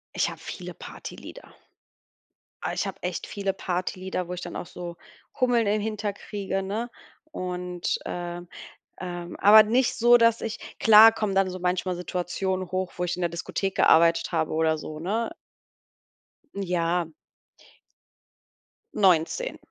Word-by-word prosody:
Ich -, -, +1 dB
habe -, -, -9 dB
viele -, -, -7 dB
Partylieder. -, -, -10 dB, 1.1 s
Oh, -, -, -1 dB
ich -, -, -2 dB
habe -, -, -7 dB
echt -, -, -3 dB
viele 200 Hz, -1 st, -2 dB
Partylieder, 185 Hz, 0 st, -3 dB
wo -, -, -5 dB
ich 180 Hz, -, -6 dB
dann 175 Hz, -, -7 dB
auch -, -, -5 dB
so 175 Hz, -1 st, -8 dB, 0.4 s
Hummeln 245 Hz, -3 st, +3 dB
im 210 Hz, +1 st, +1 dB
Hinter 210 Hz, -1 st, -2 dB
kriege, 195 Hz, -1 st, -4 dB
ne? 215 Hz, +5 st, -3 dB, 0.3 s
Und, 180 Hz, -, -3 dB
äh, 175 Hz, 0 st, -5 dB, 0.6 s
ähm 175 Hz, -1 st, -6 dB
aber 215 Hz, +2 st, +9 dB
nicht 240 Hz, +4 st, +1 dB
so, 240 Hz, +1 st, +6 dB
dass 230 Hz, -1 st, +4 dB
ich 225 Hz, 0 st, -4 dB, 0.2 s
klar 220 Hz, +1 st, +9 dB
kommen 215 Hz, -3 st, -2 dB
dann 195 Hz, -1 st, +2 dB
so 185 Hz, -, -6 dB
manchmal 180 Hz, 0 st, -1 dB
Situationen 185 Hz, +1 st, -3 dB
hoch, 185 Hz, 0 st, -2 dB
wo 180 Hz, -, -1 dB
ich 175 Hz, 0 st, -2 dB
in 180 Hz, -, -5 dB
der 175 Hz, -, +2 dB
Diskothek 190 Hz, +3 st, -3 dB
gearbeitet 165 Hz, +2 st, +4 dB
habe 160 Hz, -2 st, 0 dB
oder 160 Hz, 0 st, +1 dB
so, 155 Hz, 0 st, -7 dB
ne? 220 Hz, -, -1 dB, 1.2 s
Ja. 175 Hz, -3 st, 0 dB, 1.9 s
19. 195 Hz, -, +2 dB
185 Hz, 145 wpm, -26 LUFS, 175-215 Hz, 1.9 s, aber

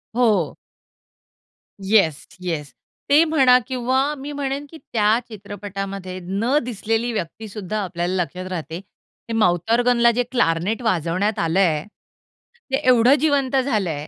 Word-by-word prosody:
हो. 215 Hz, -10 st, +2 dB, 1.3 s
Yes, 165 Hz, -10 st, +3 dB, 0.2 s
yes. 150 Hz, -7 st, -4 dB, 0.4 s
ते 300 Hz, +3 st, +6 dB
म्हणा 265 Hz, -6 st, +5 dB
किंवा 260 Hz, +3 st, 0 dB
मी 285 Hz, +2 st, -7 dB
म्हणेन, 280 Hz, 0 st, -3 dB
की 320 Hz, -, -11 dB
त्या 220 Hz, -4 st, +1 dB
चित्रपटामध्ये 195 Hz, -2 st, -6 dB
न 220 Hz, +10 st, 0 dB
दिसलेली 225 Hz, 0 st, -2 dB
व्यक्ती 215 Hz, +2 st, -5 dB
सुद्धा 210 Hz, +1 st, -4 dB
आपल्याला 175 Hz, 0 st, -3 dB
लक्षात 180 Hz, +2 st, -8 dB
राहते. 165 Hz, -1 st, -4 dB, 0.5 s
हे -, -, -2 dB
माउथ 175 Hz, 0 st, +2 dB
ऑर्गनला 240 Hz, 0 st, +4 dB
जे 245 Hz, +2 st, 0 dB
क्लार्नेट 210 Hz, 0 st, +1 dB
वाजवण्यात 185 Hz, +1 st, 0 dB
आलंय. 165 Hz, -2 st, +2 dB, 0.9 s
ते -, -, +3 dB
एवढं 250 Hz, +2 st, +6 dB
जिवंत 280 Hz, -3 st, +1 dB
झालंय, 180 Hz, -, -2 dB
215 Hz, 125 wpm, -21 LUFS, 180-250 Hz, 1.3 s, ते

